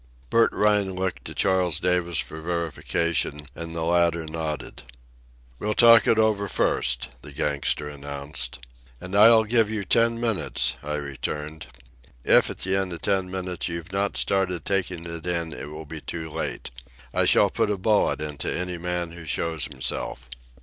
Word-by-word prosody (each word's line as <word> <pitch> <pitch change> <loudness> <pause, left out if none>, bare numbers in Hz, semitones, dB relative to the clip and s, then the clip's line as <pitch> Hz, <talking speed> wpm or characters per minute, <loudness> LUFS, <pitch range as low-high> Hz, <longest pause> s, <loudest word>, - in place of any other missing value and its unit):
Bert 115 0 +4
Rhine 105 -2 +2
looked 95 0 -3
to - - -7
Charles 90 -4 +2
Davis 90 -2 0
for 75 +4 -3
verification, 85 -2 -1
and 85 +1 -6
the 80 - -2
latter 85 -1 +2
nodded. 80 -4 -5 0.8
"We'll 105 +1 -1
talk 115 -1 +7
it 115 - +4
over 110 -2 +2
first," 60 -8 0
the 75 - -10
gangster 75 0 -1
announced. 70 -1 -4 0.4
"And 90 +2 -6
I'll 110 +2 +7
give 110 -1 +2
you 110 -2 -2
ten 115 +4 +3
minutes," 115 -4 0
I 75 +1 -3
returned. 75 +2 -5 0.6
"If - - +5
at - - -6
the 95 +1 +1
end 95 -1 0
of 85 - -8
ten 95 -2 +1
minutes 90 -2 -3
you've 85 +1 -5
not 100 0 0
started 95 -4 0
taking 95 -3 -1
in, 85 -1 -3
it 70 - -7
will 75 +1 -8
be 75 +1 -8
too 80 -1 -6
late. 65 - -4 0.4
I - - +2
shall - - +5
put - - 0
a 105 - 0
bullet 105 +2 +2
into 75 -3 -3
any 90 0 -3
man 90 -1 -2
who 85 -1 -10
shows 80 -1 -1
himself." 65 -2 -4
85 Hz, 165 wpm, -25 LUFS, 75-95 Hz, 0.8 s, talk